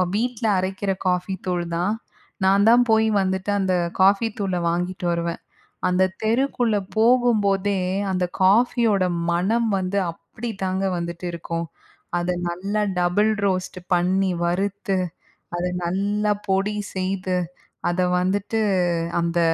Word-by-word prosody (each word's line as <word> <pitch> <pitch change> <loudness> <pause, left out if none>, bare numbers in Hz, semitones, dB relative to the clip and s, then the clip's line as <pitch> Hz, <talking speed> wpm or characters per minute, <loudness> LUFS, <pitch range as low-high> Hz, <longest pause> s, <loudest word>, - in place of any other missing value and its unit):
வீட்ல 235 +1 -1
அரைக்கிற 190 +1 -2 0.2
காஃபி 180 +1 0
தூள் 175 -1 0
தான். 180 +5 +1 0.5
நான் 195 +1 +4
தான் 240 +1 +6
போய் 220 0 +4
வந்துட்டு 190 +1 -1
அந்த 190 -1 +1 0.3
காஃபி 200 +4 +5
தூள 195 -2 -1
வாங்கிட்டு 180 +2 -2
வருவேன். 170 0 -2 0.5
அந்த 180 +1 +3 0.2
தெருக்குள்ள 235 -1 +1 0.2
போகும்போதே, 210 -5 +3 0.3
அந்த 185 -1 0 0.2
காஃபியோட 215 0 +4 0.3
மணம் 220 +7 +1
வந்து 190 +1 -2
அப்படிதாங்க 195 0 -4
வந்துட்டு 170 +1 -5
இருக்கும். 170 0 -4 0.5
அத 175 +1 0 0.2
நல்லா 200 +5 -2 0.2
டபுள் 205 +5 +2
ரோஸ்ட்டு 185 -1 -1
பண்ணி, 185 +2 +2
வறுத்து, 195 +2 -1 0.6
அத 175 - -2 0.2
நல்லா 205 +4 0 0.2
பொடி 195 +2 +1 0.2
செய்து, 185 0 -1 0.5
அத 175 +1 0 0.2
வந்துட்டு 200 +4 0 0.6
அந்த 170 0 0
190 Hz, 115 wpm, -23 LUFS, 180-210 Hz, 0.6 s, தான்